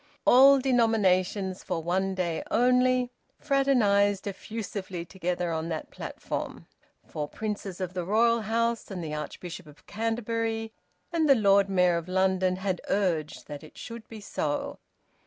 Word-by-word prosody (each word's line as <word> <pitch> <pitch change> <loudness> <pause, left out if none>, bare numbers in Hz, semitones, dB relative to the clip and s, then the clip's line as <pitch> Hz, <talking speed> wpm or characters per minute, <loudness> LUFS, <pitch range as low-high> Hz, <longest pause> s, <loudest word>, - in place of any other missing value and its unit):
All 275 +2 +8
denominations, 205 -7 +1
for 165 - -3
one 190 +3 0
day 170 -3 -1
only, 250 +1 +3 0.3
fraternised 215 -9 +2
effusively 200 -3 -5
together 180 -1 -2
on 160 0 -2
that 160 -2 -5
platform; - - -6 0.4
for 150 -1 -4
princes 205 -1 -5
of 185 -1 -4
the 180 -1 -2
royal 230 +5 +3
house, 230 +2 -1
and 185 -4 -5
the 155 -1 -5
Archbishop 165 +3 -6
of 145 -1 -17
Canterbury 225 0 -2 0.4
and 320 -3 +2
the 275 - +8
Lord 200 -3 +4
Mayor 180 -2 +3
of 170 0 -5
London 190 0 +2
had 190 -1 -2
urged 170 -7 0
that 145 0 -8
it 155 - -14
should 230 -1 -8
be 225 - -9
so. 150 -7 -3
195 Hz, 140 wpm, -27 LUFS, 180-230 Hz, 0.4 s, All